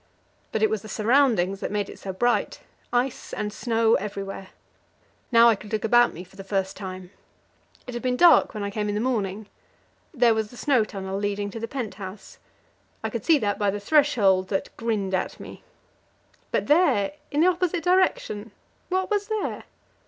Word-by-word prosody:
But 220 - -1
it 220 - +4
was 220 -2 -1
the 215 - -11
surroundings 215 -5 +2
that - - -3
made 205 -1 -2
it - - -11
so 195 - -5
bright 240 +6 0 0.3
ice 245 +2 -1
and 210 0 -3
snow 230 -2 +1
everywhere. 195 -1 -3 0.8
Now 230 0 +7
I 230 - +6
could 205 +1 -12
look 215 - -1
about 240 +2 +5
me 175 - -9
for 190 +2 -20
the 195 - -7
first 195 -1 -2
time; 185 -2 -8 0.7
it 250 - -7
had 240 - -4
been 250 -1 0
dark 345 -7 +6
when 210 - -3
I 200 - -3
came 210 0 -2
in 205 - -1
the - - 0
morning. 215 -4 -2 0.7
There 245 -6 +4
was 220 -1 -2
the 245 - -14
snow 260 -5 +2
tunnel 195 -2 -5
leading 205 0 -2
to 225 - -6
the 230 - -4
pent 245 -6 -4
house; 190 +1 -9 0.6
I - - -2
could - - -4
see 325 -2 +5
that 205 -6 -1
by 205 -1 +2
the 205 +1 -2
threshold 205 -7 +3
that 195 0 -3
grinned 215 -5 -2
at 185 - -2
me. - - -11 0.9
But - - 0
there, 290 - +3 0.2
in 295 +1 0
the - - +5
opposite 350 -1 -1
direction, 355 - +1 0.4
what 375 +2 -1
was 410 -1 0
there? 435 -2 -3
215 Hz, 190 wpm, -25 LUFS, 200-255 Hz, 0.9 s, Now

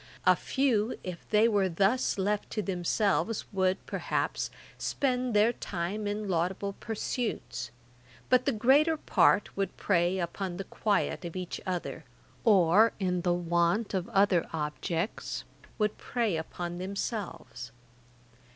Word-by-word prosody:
A - - +7
few, 250 -5 +1
if 180 -2 -7
they 215 +1 +5
were 200 -4 +2
thus 200 +10 +2
left 205 +2 0
to 215 - -2
themselves, 195 +4 0
would, 190 0 +1
perhaps, - - -2 0.3
spend 250 -4 0
their 215 +3 +5
time 200 +2 -3
in 205 0 -2
laudable 190 +3 -1
pursuits; 220 - -3 0.6
but 255 0 +4
the - - +5
greater 275 +8 +4
part 210 -7 +3
would 195 -2 -2
prey 175 -1 +2
upon 180 +1 -3
the 195 - -3
quiet 205 -1 0
of 170 0 -6
each 185 -1 -4
other, 180 -2 -3 0.4
or, 205 0 +5
in 180 -2 0
the 175 0 +2
want 175 +5 +1
of 185 -2 -1
other 195 -3 +3
objects, 165 +5 -3 0.3
would 210 -1 0
prey 230 -7 -1
upon 175 +2 -4
themselves. 185 - -5
195 Hz, 130 wpm, -29 LUFS, 175-215 Hz, 0.6 s, A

